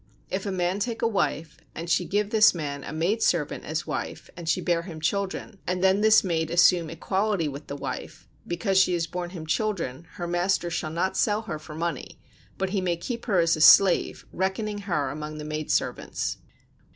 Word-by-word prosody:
If 190 +2 -2
a - - -1
man 180 +1 0
take 230 +2 -3
a - - +4
wife 165 -7 -1 0.2
and 165 +2 -5
she 175 +1 +2
give 205 +3 0
this 220 -3 +6
man 140 -4 -4
a - - -6
maid 175 +9 0
servant 165 -4 0
as 155 +2 -3
wife - - -5
and 170 -2 -5
she - - +2
bear 170 -2 +1
him 170 -2 -8
children, 195 +5 -2
and 180 +1 -1
then 190 +2 +4
this 220 0 +6
maid 165 -4 -1
assume 175 -1 +4
equality 190 +1 -1
with 140 +1 -7
the 140 - -5
wife: - - -6 0.2
because 185 +3 +1
she 185 -1 +4
has 170 -1 0
borne 175 +1 -5
him 170 -3 -8
children 165 - -2
her 175 - -5
master 175 0 0
shall 160 -1 -2
not 170 +4 -1
sell 210 +1 +1
her 165 -8 -5
for 155 0 -10
money, 170 +1 -4 0.4
but 190 -1 -2
he 195 -2 0
may 175 -2 0
keep 235 +8 -5
her 200 -5 +2
as 165 0 +3
a 155 - -4
slave, 185 +3 +6
reckoning 205 +3 -2
her 170 -9 -1
among 150 +1 -6
the 150 - -6
maid 155 0 -4
servants. - - -1
175 Hz, 205 wpm, -26 LUFS, 160-195 Hz, 0.4 s, this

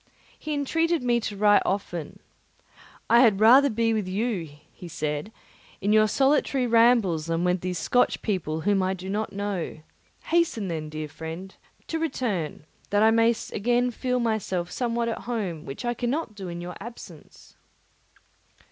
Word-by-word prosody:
He 305 -1 -3
entreated 325 +2 0
me 240 -1 +2
to 210 -3 -5
write 205 0 +5
often. 180 -5 -3 0.9
"I 235 - +6
had 220 -6 +5
rather 260 +6 +7
be 225 -1 +1
with 210 -4 -1
you," 195 -4 -2 0.2
he 175 - -11
said, 150 +3 -3 0.5
"in 205 +2 +1
your 215 0 +5
solitary 270 +1 +2
rambles, 230 -9 +3
than 165 +1 0
with 180 0 +1
these 180 -1 -3
Scotch 245 +9 +1
people, 160 -7 -2
whom 200 +2 +2
I 185 +1 0
do 190 +1 -7
not 215 +2 -2
know; 200 -5 -4 0.4
hasten, 325 - +1
then, 160 -2 -3
my - - -8
dear 155 0 -5
friend, 160 +5 -8 0.3
to 325 - -3
return, 220 - -2 0.2
that 205 +1 +3
I 220 - +6
may 230 +1 +4 0.2
again 245 +3 +1
feel 250 +1 -1
myself 205 -6 -1
somewhat 235 -1 -1
at 230 - -2
home, 190 -10 -3
which 135 - -7
I 240 - 0
cannot 245 +1 -2
do 195 -3 -8
in 175 0 -6
your 175 0 -7
absence." 200 -8 -12
210 Hz, 165 wpm, -26 LUFS, 180-240 Hz, 0.9 s, rather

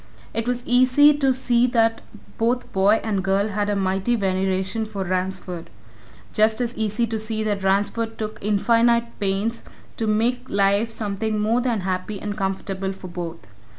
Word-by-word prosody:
It 230 +1 -2
was 245 0 -2
easy 255 +4 +5
to 270 -2 +3
see 250 -1 +2
that 225 -2 +2 0.4
both 240 +2 0
boy 200 +3 +4
and 200 -4 -1
girl 195 +2 +1
had 205 0 -1
a 205 - +1
mighty 195 +4 0
veneration 190 +1 -1
for 200 -2 -4
Ransford; 185 -1 -3 0.6
just 220 +1 +3
as 245 -1 -2
easy 220 +2 0
to 225 -1 -3
see 220 0 -2
that 205 -2 -1
Ransford 205 +4 0
took 215 0 -5
infinite 235 +3 +2
pains 205 +4 -1 0.4
to 225 - -1
make 245 +4 0
life 200 +3 +2
something 215 -1 -2
more 225 +4 +2
than 235 -5 0
happy 185 +2 -3
and 205 0 -4
comfortable 195 -1 -3
for 190 -1 -10
both. 170 - -6
215 Hz, 160 wpm, -23 LUFS, 195-230 Hz, 0.6 s, easy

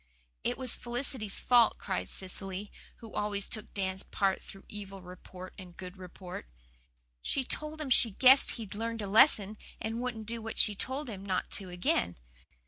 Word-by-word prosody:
"It - - 0
was 255 -3 +1
Felicity's 240 -3 -1
fault," 240 -2 +5
cried 190 -2 -3
Cecily, 195 +1 -4 0.2
who 225 -2 -12
always 205 -1 0
took 215 -2 -3
Dan's 190 -1 -1
part 195 -2 0
through 195 - -12
evil 195 -2 -6
report 180 +1 -10
and 180 -2 -11
good 185 0 -8
report. 180 - -8 0.7
"She 270 - 0
told 305 +4 -4
him 290 -4 -4
she 240 - +6
guessed 260 +6 +6
he'd 220 -5 -7
learned 225 +1 -3
a - - -3
lesson 210 -1 +5 0.2
and 225 +2 -3
wouldn't 240 -3 -3
do 230 +1 -3
what 225 0 -6
she'd 205 -2 +5
told 265 +3 -2
him 200 -4 -6
not 190 -2 -1
to 190 -2 0
again. 175 - 0
210 Hz, 170 wpm, -31 LUFS, 190-235 Hz, 0.7 s, she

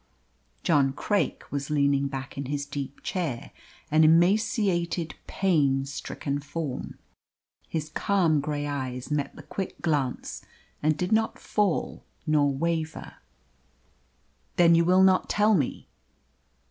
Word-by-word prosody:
John 140 -5 +3
Craik 205 +8 -1
was 140 0 -3
leaning 140 -2 +2
back 135 -2 -6
in 140 - -4
his 145 0 -2
deep 140 -1 -6
chair 160 -11 -3 0.4
an 155 +1 +5
emaciated, 175 0 +2
pain 145 -8 +2
stricken 140 0 -4
form. 145 -1 -5 0.7
His 155 -2 -3
calm 170 -3 +2
grey 145 0 -2
eyes 130 -2 -4
met 145 -1 -1
the - - -11
quick 195 - -5
glance, 145 -6 -1 0.4
and 155 0 +2
did 180 +2 -2
not 220 0 +2
fall 205 -5 -1 0.2
nor 150 -2 +3
waver. 160 +2 -3 1.4
"Then 170 -1 +6
you 170 0 +4
will 185 +2 +5
not 190 -1 +4
tell 210 +1 +3
me?" 150 -10 -1
155 Hz, 120 wpm, -27 LUFS, 140-175 Hz, 1.4 s, Then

